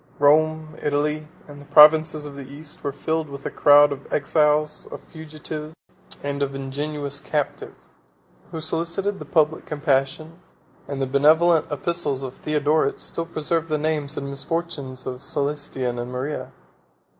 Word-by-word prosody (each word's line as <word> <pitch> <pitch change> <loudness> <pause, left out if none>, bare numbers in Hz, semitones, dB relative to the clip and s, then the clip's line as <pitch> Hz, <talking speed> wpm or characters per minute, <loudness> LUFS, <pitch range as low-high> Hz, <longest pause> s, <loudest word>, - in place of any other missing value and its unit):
Rome, 155 +1 +2
Italy, 150 +1 -1 0.2
and 145 -1 -11
the - - -14
provinces 155 +1 +6
of 145 -1 -8
the 140 -1 -9
East, 145 +1 -9
were 140 - -1
filled 160 +2 -2
with 140 0 -9
a - - -2
crowd 145 0 +6
of 140 0 -7
exiles, 150 +1 +1
of - - -6
fugitives, 155 0 -8 0.5
and 140 0 -3
of 140 -1 -1
ingenuous 140 +1 -4
captives, 150 0 -4 0.6
who 160 - -6
solicited 170 +5 -2
the - - -7
public 155 -1 +1
compassion; 150 +2 -1 0.5
and 140 -1 -3
the - - +1
benevolent 155 +5 +4
epistles 145 -2 -1
of 130 -1 -6
Theodoret 150 -1 +1
still 165 0 -4
preserve 165 0 -2
the 155 - +1
names 150 -1 -2
and 140 - -3
misfortunes 140 -2 -4
of 130 -1 -4
Cælestian 140 -4 -2
and 120 +1 -6
Maria. 130 +4 -4
150 Hz, 145 wpm, -23 LUFS, 140-155 Hz, 0.6 s, provinces